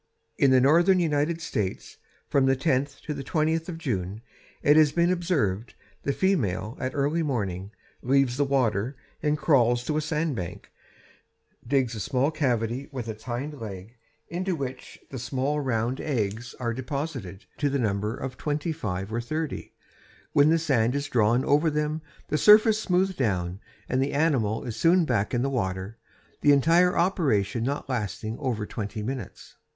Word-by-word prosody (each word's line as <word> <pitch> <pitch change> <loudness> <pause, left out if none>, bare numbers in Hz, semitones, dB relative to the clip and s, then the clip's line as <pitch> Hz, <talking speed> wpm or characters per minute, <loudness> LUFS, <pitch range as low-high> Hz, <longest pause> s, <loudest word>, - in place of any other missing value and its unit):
In 140 - +4
the 130 -1 +6
northern 170 +8 +5
United 160 0 0
States, 100 -11 -3 0.3
from 135 -1 +2
the 135 - +4
tenth 140 0 0
to 150 - -3
the 140 - -5
twentieth 160 +3 0
of 165 - -5
June, 105 - -3 0.4
it 145 - +6
has 155 -2 +6
been 170 +2 +2
observed, 140 - -1 0.3
the 140 - 0
female, 115 - 0
at 130 0 -3
early 145 +4 +1
morning, 100 - -2 0.3
leaves 135 -1 +2
the 145 - +2
water 125 -3 0 0.2
and 150 0 +1
crawls 120 -6 +3
to 155 +1 0
a - - +1
sandbank, 150 - -3 1.0
digs 130 -3 +1
a 110 - -5
small 135 +5 +1
cavity 125 -3 -1
with 125 -4 -5
its 110 -1 -7
hind 135 +4 -4
leg, 105 +1 -8 0.3
into 185 +1 -2
which 130 -4 -6
the 130 - -5
small, 135 +4 -1
round 125 -1 -1
eggs 115 -3 -2
are 120 -2 -1
deposited 130 - -5
to 145 - +2
the 140 - 0
number 105 -1 -1
of 130 -2 -6
twenty 150 +2 -2
five 100 - -4
or 120 - 0
thirty, 155 +4 -4 0.6
when 145 +1 +5
the 165 - +4
sand 130 -6 +1
is 140 0 -2
drawn 120 +1 +2
over 150 +3 +3
them, 150 +1 -1 0.3
the 150 - +1
surface 215 +1 +6
smoothed 190 -1 +1
down, 95 -7 -1 0.3
and 130 +1 0
the 135 - -1
animal 135 -8 +1
is 115 - -5
soon 170 +8 +4
back 115 -7 0
in 120 0 0
the - - +1
water, 100 -4 -3 0.4
the 145 - +6
entire 170 +6 +4
operation 130 - +1
not 140 +3 -2
lasting 110 -3 -3
over 120 -7 -2
twenty 105 0 -5
minutes. 125 -2 -6
135 Hz, 165 wpm, -26 LUFS, 115-150 Hz, 1.0 s, the